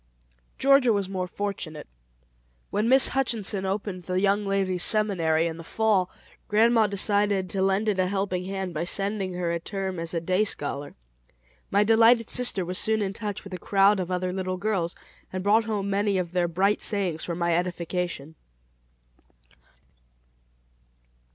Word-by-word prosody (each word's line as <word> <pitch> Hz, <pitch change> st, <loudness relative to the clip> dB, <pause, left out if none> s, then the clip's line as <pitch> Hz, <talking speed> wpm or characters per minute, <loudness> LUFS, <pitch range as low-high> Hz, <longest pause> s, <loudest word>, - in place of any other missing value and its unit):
Georgia 275 Hz, -2 st, +4 dB
was 200 Hz, -3 st, 0 dB
more 185 Hz, -1 st, -3 dB
fortunate. 180 Hz, -5 st, -5 dB, 0.9 s
When 215 Hz, +3 st, 0 dB
Miss 265 Hz, +1 st, +7 dB
Hutchinson 220 Hz, -7 st, -1 dB
opened 195 Hz, -1 st, -3 dB
"The 185 Hz, +1 st, -2 dB
Young 200 Hz, +1 st, +1 dB
Ladies' 190 Hz, -2 st, 0 dB
Seminary" 175 Hz, -8 st, +3 dB
in 165 Hz, -1 st, -4 dB
the 165 Hz, -, -9 dB
Fall, 205 Hz, -1 st, +1 dB, 0.4 s
grandma 225 Hz, +1 st, +3 dB
decided 200 Hz, -2 st, 0 dB
to 195 Hz, -, -1 dB
lend 195 Hz, +3 st, +1 dB
it 200 Hz, -3 st, 0 dB
a 185 Hz, -, +2 dB
helping 190 Hz, -2 st, -2 dB
hand 190 Hz, -2 st, -4 dB
by 155 Hz, +1 st, -2 dB
sending 195 Hz, +1 st, -1 dB
her 175 Hz, -1 st, -2 dB
a 170 Hz, -, -2 dB
term 190 Hz, 0 st, -4 dB
as 165 Hz, +1 st, -3 dB
a -, -, +1 dB
day 185 Hz, +5 st, +1 dB
scholar. 145 Hz, -7 st, -2 dB, 0.7 s
My 200 Hz, +1 st, +3 dB
delighted 225 Hz, +1 st, +4 dB
sister 240 Hz, -7 st, +2 dB
was 180 Hz, +1 st, -2 dB
soon 220 Hz, -1 st, +1 dB
in 195 Hz, -1 st, -3 dB
touch 205 Hz, -1 st, -5 dB
with 195 Hz, -, -10 dB
a 180 Hz, -, -5 dB
crowd 200 Hz, 0 st, +3 dB
of 180 Hz, -1 st, -3 dB
other 180 Hz, 0 st, -2 dB
little 185 Hz, -1 st, -3 dB
girls, 190 Hz, -4 st, -2 dB, 0.4 s
and 185 Hz, 0 st, -4 dB
brought 215 Hz, +3 st, +3 dB
home 210 Hz, -3 st, -2 dB
many 200 Hz, 0 st, +1 dB
of 175 Hz, -2 st, -3 dB
their 180 Hz, -1 st, +1 dB
bright 195 Hz, +5 st, +1 dB
sayings 185 Hz, -7 st, -2 dB
for 170 Hz, -, -4 dB
my 170 Hz, -1 st, 0 dB
edification. 175 Hz, -3 st, -3 dB
195 Hz, 160 wpm, -25 LUFS, 180-210 Hz, 0.9 s, Miss